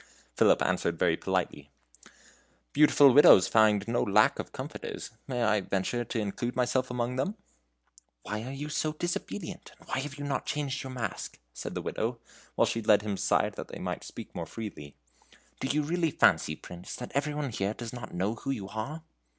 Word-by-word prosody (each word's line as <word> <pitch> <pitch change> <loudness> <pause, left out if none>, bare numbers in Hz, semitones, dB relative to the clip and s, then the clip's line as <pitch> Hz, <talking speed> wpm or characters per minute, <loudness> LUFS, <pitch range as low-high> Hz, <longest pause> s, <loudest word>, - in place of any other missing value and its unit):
Philip - - +5
answered 85 -1 0
very 85 -1 +3
politely: 85 -6 -2 1.0
"Beautiful 145 -2 +7
widows 125 -9 +8
find 105 -2 +4
no 120 +1 +1
lack 100 - +4
of - - -5
comforters. - - -6 0.2
May 125 -3 -1
I 110 -2 +3
venture 100 +6 -1
to 115 - -3
include 110 +4 -3
myself 130 +1 +1
amongst 125 0 -2
them?" 195 +10 -1 0.9
"Why 105 +2 -3
are 130 - -5
you 140 +2 -5
so 155 0 -1
disobedient? 175 +3 -4
and - - -20
why - - -1
have 140 +1 -5
you 145 - -5
not 140 -1 -2
changed 145 -2 -2
your 130 - -6
mask?" 115 -6 -4 0.2
said - - -6
the - - -3
Widow, 115 +2 -2 0.4
while - - +4
she 115 - -1
led 105 -1 +4
him 105 -1 -2
aside 95 - +1
that - - -5
they - - -8
might - - -4
speak - - -9
more - - -5
freely. 95 -10 -7 0.6
"Do 130 - -2
you 150 +2 +1
really 165 +2 +1
fancy, 80 - +3
Prince, 90 +3 -9
that 125 - -7
every 145 +1 0
one 145 -3 -2
here 100 0 -1
does 120 -1 -7
not 120 -3 -7
know 95 +5 -1
who 115 - -7
you 105 -8 -3
are?" 120 +10 -5
120 Hz, 190 wpm, -29 LUFS, 105-140 Hz, 1.0 s, widows